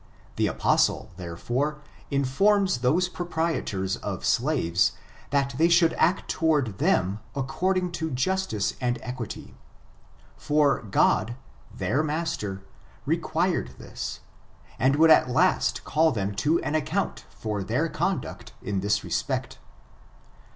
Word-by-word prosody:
The - - +1
apostle, - - +1
therefore, 120 - -2 0.3
informs 170 +5 +2
those 155 +9 +2
proprietors 160 - -2
of - - -5
slaves, 115 - +2 0.4
that 140 0 +1
they 165 +1 +5
should 170 -1 +5
act 180 +4 +1
toward 145 - 0
them 95 +3 +2 0.2
according 180 +7 0
to 160 - -1
justice 135 - -1
and 120 -1 0
equity; 125 -3 -6 0.8
for 145 -2 +2
God, 110 +2 +2 0.4
their 140 - 0
master, 155 - -3 0.4
required 165 +3 0
this, - - -6 0.6
and 135 +2 +3
would 160 +2 +6
at 155 - +6
last 125 - +2
call 160 +2 +2
them 100 -5 -2
to 155 +11 +2
an 150 - -2
account 155 -2 -1
for 105 -3 -4
their - - 0
conduct - - -3
in 100 -1 -1
this 100 +2 0
respect. - - -2
140 Hz, 115 wpm, -26 LUFS, 110-165 Hz, 0.8 s, would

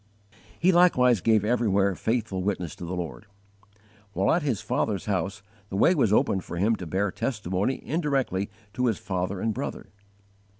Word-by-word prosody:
He 180 +3 +4
likewise 125 - +4
gave 110 +1 +3
everywhere 105 -4 +2
faithful 110 -2 -1
witness 90 -4 -2
to 90 - -7
the 90 +2 -4
Lord. 80 -9 -6 0.9
While 95 0 +2
at 175 - +2
his 130 -9 -1
father's 100 -4 -1
house 100 0 -2 0.3
the 95 - -5
way 170 - +5
was 130 - +2
opened 95 -3 +2
for 85 - -7
him 105 +6 +2
to 90 - -7
bear 95 +4 0
testimony 105 0 -2
indirectly 135 - -1 0.2
to 125 +3 0
his 110 - +1
father 95 0 -3
and 110 +2 0
brother. - - -5
100 Hz, 165 wpm, -26 LUFS, 95-125 Hz, 0.9 s, way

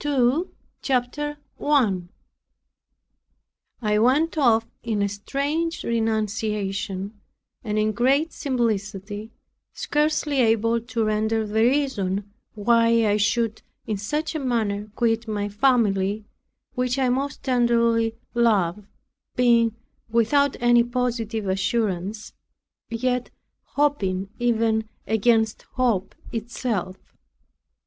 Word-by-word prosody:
PART 290 -1 -1
TWO 260 +9 +2 0.3
CHAPTER 285 +3 -1 0.2
1 210 -12 +1 1.7
I 210 0 +2
went 280 +9 +3
off, 235 -7 +3 0.2
in 215 -3 -1
a - - +2
strange 285 - -2
renunciation, 210 -3 -2 0.4
and 215 -2 -2
in 215 0 +2
great 270 +9 +2
simplicity, 210 -4 -2 0.4
scarcely 295 -1 0
able 230 0 +2
to 230 0 -2
render 220 +1 0
the 210 - -8
reason 210 -7 0 0.2
why 230 +1 +3
I 210 0 +3
should 220 +1 0 0.2
in 215 - -2
such 300 +12 -2
a 315 - -2
manner 215 -6 -1
quit 230 0 +1
my 205 -1 -2
family, 205 -3 +1 0.5
which 250 0 -1
I 260 -2 +2
most 275 +3 -2
tenderly 235 -3 +2 0.2
love, 210 -5 +1 0.5
being 235 -2 +3 0.3
without 260 +5 +2
any 240 0 +5
positive 235 -3 -2
assurance, 195 +1 -1 0.6
yet 250 +1 -1 0.5
hoping 195 -10 +1
even 225 -2 +1 0.2
against 220 0 +2 0.2
hope 230 -7 +1 0.2
itself. 225 -4 -3
230 Hz, 100 wpm, -24 LUFS, 210-250 Hz, 1.7 s, any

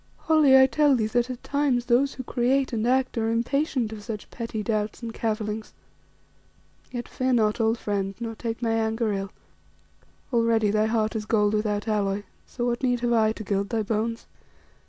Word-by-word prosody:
Holly, 305 -4 +5
I 265 - +8
tell 285 +2 +3
thee 225 -3 +1
that 240 +3 0
at 255 -1 -6
times 280 -4 0
those 255 +3 +2
who 255 - -6
create 255 +2 0
and 225 0 0
act 255 -1 +1
are 225 0 0
impatient 240 0 0
of 215 - -8
such 210 -1 -7
petty 230 -3 -4
doubts 215 +1 -2
and 230 -1 -5
cavillings. 215 -1 -3 1.2
Yet 240 -1 -5
fear 260 0 -1
not, 220 -1 +2
old 225 +1 +2
friend, 195 -2 -2
nor 230 -1 -4
take 230 +1 -5
my 230 - +1
anger 225 -1 0
ill. 195 0 -3 1.0
Already 230 -3 +3
thy 215 +1 +2
heart 220 0 0
is 215 -1 -3
gold 210 -1 +2
without 210 0 -1
alloy, 205 -2 0 0.2
so 240 - -4
what 240 0 -1
need 245 -2 +1
have 240 -1 +1
I 220 -2 +3
to 220 - -8
gild 200 0 -1
thy 225 -2 0
bones?" 225 +2 -2
230 Hz, 185 wpm, -25 LUFS, 215-245 Hz, 1.2 s, I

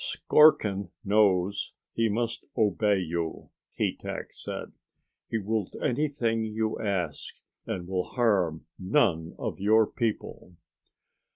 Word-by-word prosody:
"Skorkin 105 - +4 0.2
knows 100 -2 +2 0.2
he 115 -1 +1
must 115 +2 -2
obey 105 -1 +3
you," 85 -2 -3 0.3
Keetack - - -3
said. - - -6 0.6
"He 115 - 0
will 110 0 -1
do - - -13
anything 125 -5 0
you 110 0 -2
ask, 90 -7 -2 0.3
and 90 -1 -4
will 90 -1 -1
harm 95 -10 +1
none 90 - +1
of - - -4
your 110 +3 +5
people." 105 -6 -4
105 Hz, 110 wpm, -28 LUFS, 90-115 Hz, 0.6 s, your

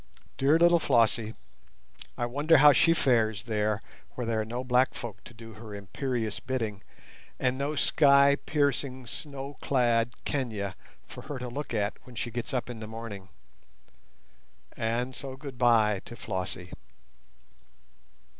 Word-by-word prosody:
Dear 140 +4 +4
little 170 0 +5
Flossie! 115 -5 +2 0.8
I 120 - 0
wonder 145 +6 +3
how 145 +1 +8
she 165 - +5
fares 115 -9 +2
there 110 -2 -1 0.3
where 125 - -3
there 115 -1 0
are - - -3
no 120 +3 -4
black 125 +1 +2
folk 110 -4 -7
to - - -12
do 115 0 -11
her 105 -1 -9
imperious 110 - -3
bidding, 110 -6 -3 0.6
and 130 0 +1
no 140 +3 -2
sky 140 -1 +5
piercing 140 -3 0
snow 140 +2 -8
clad 120 -3 +2
Kenia 110 -8 -2 0.3
for - - -9
her 145 - -3
to 125 -1 -5
look 145 +3 -5
at 105 -1 -1
when 125 - -14
she 120 +1 -3
gets 120 +4 -4
up 125 -3 -1
in 120 -2 -7
the 110 - -7
morning. 110 -4 -8 1.5
And 120 +3 -1
so 135 -2 -7
goodbye 120 -7 +2
to 120 - -9
Flossie. 95 -4 -5
120 Hz, 145 wpm, -28 LUFS, 110-135 Hz, 1.5 s, how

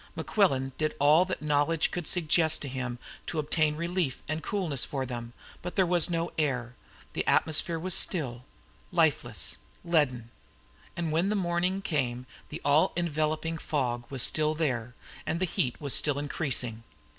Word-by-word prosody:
Mequillen 135 -11 +1
did 155 -1 0
all 150 +5 +5
that 185 -4 -4
knowledge 150 +2 +2
could 175 -3 -4
suggest 160 -2 +2
to - - -4
him 125 -2 -4 0.3
to 165 - -3
obtain 155 0 +1
relief 170 -4 -2
and 155 +1 -2
coolness 175 - -1
for 135 -2 -2
them, 120 -2 -6 0.3
but 180 - -6
there 190 - +4
was 175 0 +3
no 170 0 -1
air 125 -5 -1 0.4
the - - -1
atmosphere 160 +1 +3
was 180 +3 -1
still, 135 -10 +1 0.5
lifeless, - - +1 0.3
leaden. 130 -9 +1 0.7
And 170 -2 -1
when 170 +5 +1
the 210 - +1
morning 180 +1 0
came 125 -7 -1 0.2
the - - -7
all 150 +6 +4
enveloping 160 -1 -1
fog 120 -6 -1
was 135 -4 -1
still 155 0 +2
there, 125 -6 -2 0.3
and 165 - -1
the 185 - +2
heat 125 -7 -1
was 140 -3 0
still 145 -2 +4
increasing. 135 -6 0
155 Hz, 155 wpm, -29 LUFS, 130-170 Hz, 0.7 s, all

